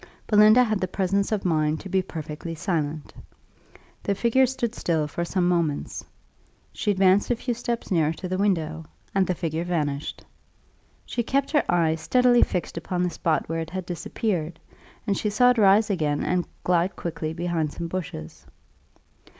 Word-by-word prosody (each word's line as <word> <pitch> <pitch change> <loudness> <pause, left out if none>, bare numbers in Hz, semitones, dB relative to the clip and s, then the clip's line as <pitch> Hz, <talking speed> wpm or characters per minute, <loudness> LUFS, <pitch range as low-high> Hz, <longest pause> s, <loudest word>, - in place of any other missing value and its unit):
Belinda 215 +3 +6
had 215 -4 0
the 185 - 0
presence 195 +2 0
of 210 -3 -1
mind 155 -2 +1
to - - -8
be 190 0 +1
perfectly 160 -1 -6
silent. 155 -4 -2 0.9
The 200 - -1
figure 240 +5 +3
stood 240 -3 -2
still 160 -8 0
for 170 +4 -3
some 175 +1 0
moments. 170 -5 -1 0.7
She - - -2
advanced 195 0 +3
a 245 - +2
few 240 +1 -2
steps 235 -1 -4
nearer 160 -4 +3
to 185 - -6
the 185 +1 -2
window, 165 -5 0 0.3
and 195 -1 +2
the 180 - 0
figure 165 -1 -2
vanished. 150 -5 -3 0.8
She 240 - -2
kept 275 +4 0
her 300 - +3
eye 165 -2 +3
steadily 245 +9 +3
fixed 175 -2 -1
upon 175 +2 -2
the 180 - 0
spot 160 -1 0
where 165 +1 -2
it 165 0 -4
had 185 +1 -5
disappeared, 175 -1 -3 0.5
and 200 - +1
she 210 - -1
saw 245 +4 +5
it 245 - 0
rise 205 +1 +5
again 150 -6 0
and 180 -1 0 0.2
glide 175 +1 +1
quickly 160 -2 -4
behind 165 -2 -1
some 170 +2 -5
bushes. 165 - -6
180 Hz, 170 wpm, -25 LUFS, 160-205 Hz, 0.9 s, Belinda